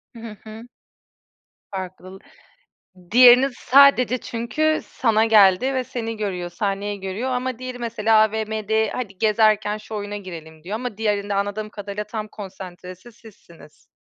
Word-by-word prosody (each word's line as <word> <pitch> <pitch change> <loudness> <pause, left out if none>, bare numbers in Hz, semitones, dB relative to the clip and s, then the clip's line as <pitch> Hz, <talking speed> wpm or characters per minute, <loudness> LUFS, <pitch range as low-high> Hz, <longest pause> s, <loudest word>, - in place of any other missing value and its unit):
Hı. - - -10
Hı 220 -2 -9
hı. 220 +2 -11 1.0
Farklıl 185 0 -8 0.9
diğerini 250 +2 +7
sadece 255 -2 +5
çünkü, 245 +8 -1
sana 225 -3 +1
geldi 215 +4 +5
ve 260 -1 -1
seni 225 -2 -5
görüyor, 180 -4 -3
sahneyi 200 +2 -3
görüyor 195 +7 -4
ama 255 -1 -3
diğeri 255 -1 -7
mesela 225 -2 0
AVM'de, 220 0 0
"Hadi 200 -7 -5
gezerken 215 -1 +2
şu 215 0 -9
oyuna 205 0 -5
girelim." 160 -5 -10
diyor 200 +4 -4
ama 240 -3 -5
diğerinde 205 -2 -1
anladığım 205 +2 -2
kadarıyla 205 0 -6
tam 215 0 -6
konsantresi 185 +1 -10
sizsiniz. 195 -9 -18
215 Hz, 135 wpm, -22 LUFS, 200-235 Hz, 1.0 s, diğerini